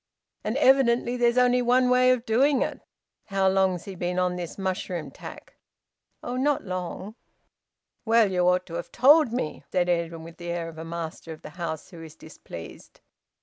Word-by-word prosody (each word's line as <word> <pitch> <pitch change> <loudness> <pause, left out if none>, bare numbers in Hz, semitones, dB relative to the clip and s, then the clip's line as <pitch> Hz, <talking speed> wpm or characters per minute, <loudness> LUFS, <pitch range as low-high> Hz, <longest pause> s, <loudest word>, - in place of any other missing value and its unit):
"And 215 +5 -2
evidently 250 -3 +3
there's 240 0 +2
only 250 0 +4
one 250 +1 +3
way 250 0 +4
of 250 -2 +2
doing 265 +4 +3
it. - - -5 0.4
How 195 -2 +1
long's 190 -2 +2
he 195 - -7
been 180 0 -3
on 180 0 +1
this 175 -2 -6
mushroom 185 -3 -3
tack?" - - -11 0.7
"Oh, 245 - -4
not 285 +2 +1
long." 185 +2 -5 0.9
"Well, 225 -3 +3
you 180 -1 +2
ought 180 0 +1
to 165 - -11
have 175 - -7
told 285 +1 +5
me," 235 -11 -3
said 180 -1 +1
Edwin, 170 -1 -1
with 165 0 -12
the 175 0 -7
air 170 -1 -3
of 160 -1 -11
a - - -5
master 165 0 -6
of 155 - -15
the - - -9
house 165 0 -6
who 170 -2 -11
is 160 -1 -11
displeased. 120 - -12
190 Hz, 185 wpm, -26 LUFS, 170-245 Hz, 0.9 s, told